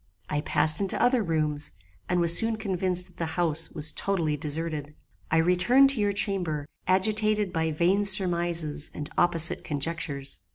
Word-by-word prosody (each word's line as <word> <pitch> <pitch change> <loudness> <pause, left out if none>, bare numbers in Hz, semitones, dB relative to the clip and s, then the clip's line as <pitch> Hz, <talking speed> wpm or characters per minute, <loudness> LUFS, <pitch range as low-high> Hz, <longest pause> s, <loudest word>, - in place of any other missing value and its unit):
I 150 -1 -1
passed 155 +3 +2
into 195 - +1
other 245 0 +2
rooms, 155 -5 -2 0.4
and 180 -1 +1
was 170 -1 +4
soon 225 -1 +2
convinced 185 -4 0
that - - -16
the 165 - -3
house 165 -2 +1
was 155 -1 0
totally 170 -6 -1
deserted. 150 0 -5 0.3
I 160 - +1
returned 185 +12 +4
to 265 - -3
your 205 0 +1
chamber, 180 -7 -1 0.2
agitated 210 +1 +1
by 160 0 -1
vain 175 +6 0
surmises 170 -5 +1
and 150 0 -7
opposite 170 -2 +3
conjectures. 145 -2 -3
170 Hz, 155 wpm, -26 LUFS, 155-195 Hz, 0.4 s, was